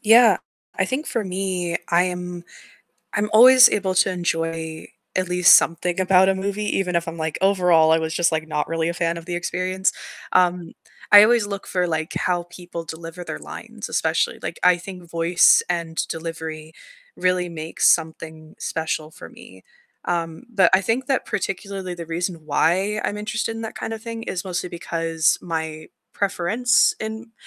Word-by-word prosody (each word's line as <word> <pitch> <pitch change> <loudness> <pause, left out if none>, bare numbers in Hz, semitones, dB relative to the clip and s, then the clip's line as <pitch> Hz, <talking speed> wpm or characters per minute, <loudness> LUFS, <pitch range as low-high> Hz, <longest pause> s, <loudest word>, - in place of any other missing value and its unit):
Yeah, 225 -3 +6 0.4
I 185 - +3
think 265 +7 -3
for 230 - -2
me, 185 -2 -2
I 175 +1 +3
am 180 -1 -5 0.7
I'm 210 +1 -1
always 250 +3 +9
able 190 -2 -1
to 190 - +4
enjoy 165 -2 -3 0.3
at 185 -1 0
least 180 +1 +7
something 170 +2 0
about 185 0 +4
a 195 - +3
movie, 200 +2 -3
even 180 -2 -2
if 170 -1 0
I'm 165 - -5
like, 160 -1 -3
overall, 180 -5 +4
I 160 - +4
was 160 0 -3
just, 170 +1 +2
like, 160 -1 -2
not 150 -1 -2
really 165 0 -1
a 170 - -3
fan 170 -1 -1
of 170 - -8
the 175 - -4
experience. 185 +2 -1 0.4
Um, 180 -1 +2 0.4
I 205 0 +10
always 225 -2 +2
look 200 -1 -6
for, 180 -1 -1
like, 160 -1 -2
how 175 -1 0
people 175 -1 -9
deliver 165 +2 -8
their 75 - -6
lines - - -9
especially. - - 0
Like, - - -6
I 180 -1 +5
think 175 -1 -11
voice 170 +1 +4
and 170 -2 -3
delivery 160 -1 -6 0.4
really 180 -1 0
makes 160 -1 0
something 160 -1 -1
special 160 -1 -3
for - - -12
me. - - -16 0.4
Um, 165 +3 -3
but 195 -7 +3
I 190 - +5
think 230 +7 -1
that 270 -3 -1
particularly 195 -1 -4
the 170 -2 -8
reason 165 -1 -4
why 190 +8 +1
I'm 205 - -2
interested 220 +2 -3
in 225 - -6
that 225 - -6
kind 225 - -5
of 225 - -6
thing 230 -1 -6
is 185 -3 -4
mostly 180 -1 -3
because 165 -1 0
my 160 -2 -5 0.2
preference 205 +5 +2
in 220 +1 -6
180 Hz, 175 wpm, -22 LUFS, 165-195 Hz, 0.7 s, I